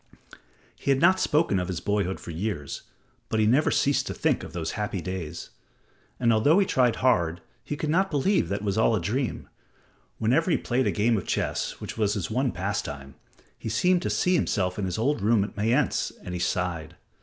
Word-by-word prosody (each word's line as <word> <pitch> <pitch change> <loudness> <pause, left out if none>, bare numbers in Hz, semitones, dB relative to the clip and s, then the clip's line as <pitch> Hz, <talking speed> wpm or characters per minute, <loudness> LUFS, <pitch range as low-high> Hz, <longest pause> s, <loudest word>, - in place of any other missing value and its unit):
He - - -5
had 135 -1 +4
not 185 +4 +5
spoken 150 - +2
of 90 - -2
his 90 -3 -3
boyhood 100 -2 -1
for - - -8
years, 85 -4 -4 0.5
but 110 - 0
he 110 - +4
never 130 +8 +3
ceased 140 0 +1
to - - -4
think - - +1
of - - -8
those 80 -2 -3
happy 105 -2 -3
days. 90 -3 -6 0.7
And 115 -2 +3
although 145 - +4
he 200 - +4
tried 125 - +2
hard, 85 -9 +2 0.2
he 145 - -4
could 150 0 -1
not 190 +4 +2
believe 170 +7 +1
that 100 +1 -2
it - - -5
was 100 +1 0
all 110 0 +4
a - - 0
dream. 115 +9 -2 0.7
Whenever 135 +11 +2
he - - +3
played 125 +1 0
a - - +2
game 110 +2 +2
of 95 - -5
chess, - - -2
which - - -7
was 105 -1 +2
his 95 -5 -3
one 130 -1 +1
pastime, 70 -8 -4 0.5
he - - -5
seemed 180 -1 +2
to - - -2
see 180 - +1
himself 95 - 0
in 100 - -1
his 90 -2 -3
old 130 +2 0
room 105 0 +3
at 105 - -6
Mayence, 120 +7 +1
and 90 - -6
he 90 - -3
sighed. 85 -2 -2
110 Hz, 210 wpm, -26 LUFS, 90-135 Hz, 0.7 s, not